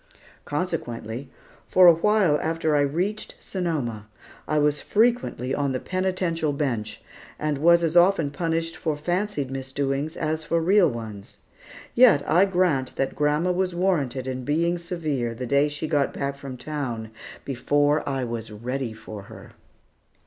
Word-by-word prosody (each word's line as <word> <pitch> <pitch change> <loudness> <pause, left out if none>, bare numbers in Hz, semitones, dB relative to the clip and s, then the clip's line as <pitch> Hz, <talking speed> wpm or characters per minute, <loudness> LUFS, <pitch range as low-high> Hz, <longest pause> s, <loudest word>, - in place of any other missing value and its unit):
Consequently, 135 -6 -4 0.4
for 185 - +6
a 175 - +10
while 180 -3 +3
after 160 -1 0
I - - +4
reached 180 +10 -1
Sonoma, 140 - -3 0.4
I 155 - 0
was 150 0 +2
frequently 220 - +1
on 140 -1 0
the 130 - -1
penitential 185 -4 -1
bench, 115 -7 -3 0.3
and 150 -2 -1
was 170 +2 +5
as 165 0 0
often 175 -4 +4
punished 165 +2 -2
for 155 -3 -2
fancied 175 -3 -2
misdoings 135 +3 -3
as 155 +1 -1
for 165 +2 0
real 180 +1 +4
ones. 110 -5 -8 0.6
Yet, 225 - +5
I 175 +6 +5
grant 175 -9 +1
that 135 - -1
grandma 150 +4 +1
was 180 0 -1
warranted 145 -9 0
in 130 -1 -4
being 170 +5 0
severe 155 -9 -3
the 125 +2 -5
day 140 +3 +3
that 150 - -3
she 145 +2 -4
got 145 -3 +1
back 140 0 -2
from 140 -2 -8
town 125 -5 -4 0.3
before 145 +3 +1
I 135 -2 -1
was 115 -2 -5
ready 120 +3 -4
for 110 -1 -9
her. - - -12
150 Hz, 150 wpm, -25 LUFS, 130-170 Hz, 0.6 s, a